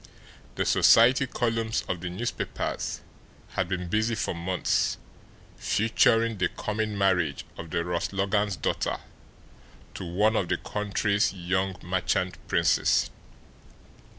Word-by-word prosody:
The -, -, 0 dB
society 125 Hz, +4 st, +5 dB
columns 115 Hz, -2 st, -1 dB
of 90 Hz, -2 st, -3 dB
the 90 Hz, -, -3 dB
newspapers 110 Hz, +7 st, -3 dB, 0.5 s
had 90 Hz, -, -2 dB
been 90 Hz, -1 st, -2 dB
busy 110 Hz, +5 st, +1 dB
for 105 Hz, -, -2 dB
months 90 Hz, +2 st, 0 dB, 0.6 s
featuring 115 Hz, 0 st, +2 dB
the 90 Hz, -, +2 dB
coming 105 Hz, -1 st, -3 dB
marriage 90 Hz, -8 st, +1 dB
of 85 Hz, -, -8 dB
the 85 Hz, +2 st, -1 dB
Ross 90 Hz, -1 st, -2 dB
Logans' 100 Hz, +1 st, 0 dB
daughter -, -, -1 dB, 1.0 s
to -, -, -6 dB
one 105 Hz, +6 st, +1 dB
of 95 Hz, -, +1 dB
the -, -, +1 dB
country's 105 Hz, 0 st, 0 dB
young 95 Hz, +1 st, -1 dB
merchant 90 Hz, 0 st, -1 dB
princes. -, -, +2 dB
100 Hz, 120 wpm, -27 LUFS, 90-110 Hz, 1.0 s, society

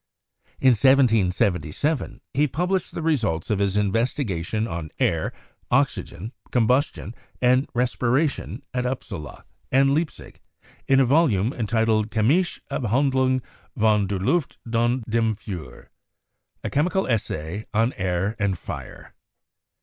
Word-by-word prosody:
In 130 Hz, -, +5 dB
1777 115 Hz, -, +2 dB
he 150 Hz, +2 st, +3 dB
published 180 Hz, +6 st, -1 dB
the 165 Hz, -, -3 dB
results 115 Hz, -, 0 dB
of 105 Hz, -, +1 dB
his 100 Hz, 0 st, +1 dB
investigation 110 Hz, -, 0 dB
on 85 Hz, -6 st, -5 dB
air, -, -, +1 dB, 0.4 s
oxygen, 110 Hz, +8 st, -1 dB, 0.2 s
combustion 125 Hz, -1 st, +1 dB, 0.3 s
and 130 Hz, +2 st, +3 dB
respiration 125 Hz, +4 st, 0 dB
at 125 Hz, 0 st, -1 dB
Upsala 95 Hz, -, -6 dB, 0.3 s
and 135 Hz, +1 st, +4 dB
Leipzig 155 Hz, -3 st, -3 dB, 0.5 s
in 135 Hz, 0 st, +5 dB
a 135 Hz, -, +5 dB
volume 125 Hz, -, +3 dB
entitled 110 Hz, -1 st, +1 dB
'Chemische 135 Hz, -, +1 dB
Abhandlung 130 Hz, +1 st, +1 dB, 0.3 s
von 105 Hz, -2 st, +3 dB
der 100 Hz, 0 st, -2 dB
Luft 145 Hz, -, 0 dB, 0.2 s
und 120 Hz, +2 st, +1 dB
dem 115 Hz, -1 st, +1 dB
Feuer' 90 Hz, -, -9 dB, 0.7 s
('A -, -, -2 dB
Chemical 180 Hz, +6 st, +1 dB
Essay 100 Hz, -4 st, -2 dB
on 115 Hz, +4 st, +1 dB
Air 95 Hz, +3 st, -1 dB
and 100 Hz, -3 st, 0 dB
Fire'). -, -, -8 dB
115 Hz, 115 wpm, -24 LUFS, 100-135 Hz, 0.7 s, In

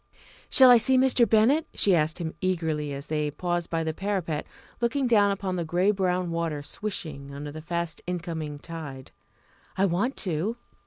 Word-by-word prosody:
"Shall 260 Hz, -2 st, +8 dB
I 245 Hz, -, +9 dB
see 260 Hz, +3 st, +3 dB
Mr. 255 Hz, -3 st, +4 dB
Bennett?" 235 Hz, +9 st, +4 dB
she 200 Hz, -, +4 dB
asked 160 Hz, -2 st, +1 dB
him 165 Hz, -3 st, -4 dB
eagerly, 160 Hz, -5 st, -1 dB
as 140 Hz, +1 st, -6 dB
they 150 Hz, -1 st, -1 dB
paused 175 Hz, +3 st, -2 dB
by 165 Hz, -1 st, -1 dB
the 160 Hz, 0 st, -2 dB
parapet, 180 Hz, -5 st, -2 dB, 0.3 s
looking 260 Hz, +3 st, +1 dB
down 210 Hz, -4 st, +4 dB
upon 195 Hz, -2 st, -2 dB
the 170 Hz, -, -1 dB
grey 175 Hz, +5 st, +2 dB
brown 180 Hz, -3 st, 0 dB
water 165 Hz, -3 st, -2 dB
swishing 150 Hz, -7 st, -5 dB
under 145 Hz, +1 st, -6 dB
the 155 Hz, +1 st, -8 dB
fast 170 Hz, 0 st, -3 dB
incoming 165 Hz, -4 st, -4 dB
tide. 145 Hz, -4 st, -8 dB, 0.7 s
"I 195 Hz, -, +3 dB
want 200 Hz, +9 st, 0 dB
to." 185 Hz, +7 st, -1 dB
175 Hz, 170 wpm, -26 LUFS, 155-205 Hz, 0.7 s, I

